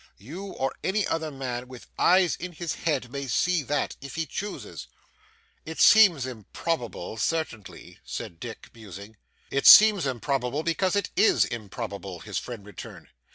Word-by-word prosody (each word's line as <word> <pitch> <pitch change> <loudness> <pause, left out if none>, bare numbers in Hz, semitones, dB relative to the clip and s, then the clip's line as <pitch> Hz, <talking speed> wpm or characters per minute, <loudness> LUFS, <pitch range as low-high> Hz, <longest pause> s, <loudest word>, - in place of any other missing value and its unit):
You 160 - -9
or 135 -8 -3
any 200 +1 0
other 160 -1 -2
man 125 -3 -5
with 125 -1 -12
eyes 180 -1 +4
in 180 0 -7
his 170 0 -4
head 140 -7 -2
may 140 0 -5
see 180 +7 +1
that, 145 +1 -2
if 140 -2 -9
he 165 0 -2
chooses.' 205 +5 -7 0.8
'It 160 0 -8
seems 190 -11 +6
improbable 125 - -5
certainly,' 110 - -4
said 85 - -7
Dick, 115 +2 -9
musing. 105 -1 -11 0.3
'It 140 - +1
seems 210 -8 +9
improbable 135 +2 -2
because 180 +3 0
it 200 - -1
is 125 - +4
improbable,' 100 -4 -6
his 105 -2 -4
friend 115 -5 -9
returned. 105 -3 -11
135 Hz, 150 wpm, -26 LUFS, 115-165 Hz, 0.8 s, seems